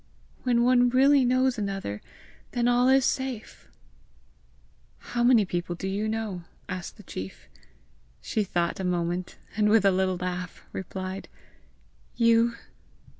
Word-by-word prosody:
When 240 -2 +2
one 245 0 +5
really 270 +2 +5
knows 255 -1 +2
another, 195 - -3 0.5
then 240 0 +1
all 245 +1 +4
is 265 0 +5
safe!" 260 -4 -3 1.3
"How 240 0 -3
many 240 -4 +5
people 175 -1 -3
do 190 - -5
you 200 +3 -1
know?" 215 -5 -3 0.2
asked 185 +2 -6
the 210 - -13
chief. 95 - -8 0.7
She 215 - -1
thought 175 -2 -1
a - - -3
moment, 175 0 -2 0.2
and 210 0 +3
with 220 -1 +4
a 195 - +6
little 185 0 +1
laugh, 180 0 -5
replied, 190 +1 -6 0.9
"You." 230 0 +4
210 Hz, 130 wpm, -27 LUFS, 180-245 Hz, 1.3 s, a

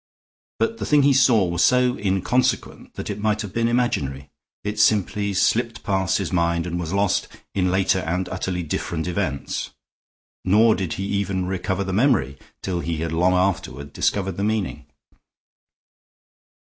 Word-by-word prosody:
But 230 - -1
the - - -3
thing 150 -2 +4
he 140 0 +5
saw 120 -6 +4
was 85 0 0
so 125 0 +3
inconsequent 95 +6 -1
that - - -4
it 100 - -5
might 110 +1 0
have 100 -1 -8
been 115 +1 +1
imaginary. 75 - -1 0.3
It 105 +1 -3
simply 105 -1 +2
slipped 115 +3 +1
past 95 -3 +1
his 95 -2 -3
mind 85 -1 +1
and 90 0 -3
was 85 -2 -4
lost 100 -1 +1 0.3
in 90 -2 +1
later 95 0 +2
and 90 +1 -2
utterly 90 -1 -3
different 80 +1 -3
events; 90 -6 -3 0.7
nor 110 +4 +5
did 95 -5 -2
he 95 - -4
even 100 -2 -1
recover 95 +1 -2
the 95 -1 -4
memory 95 - +2 0.2
till 90 -2 -2
he 85 0 -3
had 80 -1 -2
long 90 +3 +3
afterward 90 -7 -1
discovered 95 -3 -1
the 100 - -1
meaning. 100 -9 -2
95 Hz, 160 wpm, -23 LUFS, 85-105 Hz, 0.7 s, he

